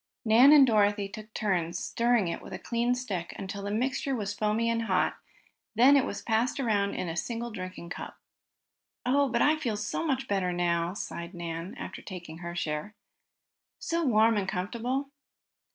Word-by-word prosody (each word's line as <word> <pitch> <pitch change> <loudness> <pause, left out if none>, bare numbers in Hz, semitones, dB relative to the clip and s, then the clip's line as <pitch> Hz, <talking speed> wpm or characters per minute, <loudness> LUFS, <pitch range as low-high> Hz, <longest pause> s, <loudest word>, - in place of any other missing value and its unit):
Nan 235 +6 +7
and 295 -3 +9
Dorothy 205 -3 +2
took 215 +2 -10
turns 175 -5 0
stirring 235 -4 +1
it 170 - -3
with - - -10
a - - -3
clean 240 +1 0
stick 200 -9 -4
until 200 +1 -5
the 200 - -4
mixture 260 +5 -1
was 205 -4 -3
foamy 215 +2 0
and 230 0 0
hot. 185 -4 +1 0.6
Then 255 +6 +7
it 275 - +4
was - - -5
passed 235 +4 +1
around 205 -6 +1
in - - -2
the 165 -1 -4
single 235 +6 -3
drinking 185 -3 -7
cup. - - -7 0.9
"Oh, 275 +2 +3
but 235 -1 +2
I 310 +1 +4
feel 240 -9 -2
so 215 +8 -2
much 270 -5 -1
better 190 -3 0
now," 175 0 0
sighed 170 -3 -6
Nan, 170 +1 -5
after - - -7
taking 170 -4 -9
her 170 0 -6
share. 155 +4 -3 0.8
"So 335 0 -1
warm 225 -4 +4
and 195 -1 -1
comfortable!" 245 +9 -2
215 Hz, 175 wpm, -29 LUFS, 185-245 Hz, 0.9 s, and